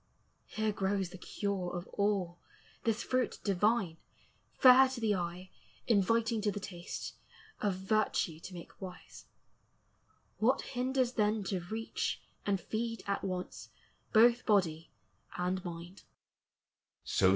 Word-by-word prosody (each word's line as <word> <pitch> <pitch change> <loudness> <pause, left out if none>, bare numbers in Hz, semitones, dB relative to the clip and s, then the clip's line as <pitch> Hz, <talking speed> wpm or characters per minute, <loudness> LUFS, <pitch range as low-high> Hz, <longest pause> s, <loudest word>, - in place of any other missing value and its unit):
Here 220 0 -1
grows 195 -2 0
the 185 0 -10
cure 195 -3 -3
of 175 +1 -4
all, 195 -4 0 0.5
this 225 -1 +1
fruit 255 -1 0
divine, 200 -3 +2 0.6
Fair 260 +1 +8
to 260 -2 -5
the 220 -2 +2
eye, 180 0 -4 0.3
inviting 225 +1 +2
to 210 0 +1
the 205 - -4
taste, 180 -4 -6 0.5
Of 205 -3 +1
virtue 190 -4 0
to 180 +3 -9
make 170 - -11
wise: 185 -1 -9 1.1
what 255 +5 +3
hinders 255 -1 0
then 215 -2 +1
To 190 0 -1
reach, 225 +1 -2 0.3
and 200 -2 +2
feed 230 +4 -3
at 200 0 -1
once 185 -2 -4 0.4
both 235 +2 +6
body 170 -6 +2 0.5
and 180 +1 -1
mind?" 175 +1 -7
200 Hz, 120 wpm, -33 LUFS, 180-225 Hz, 1.1 s, Fair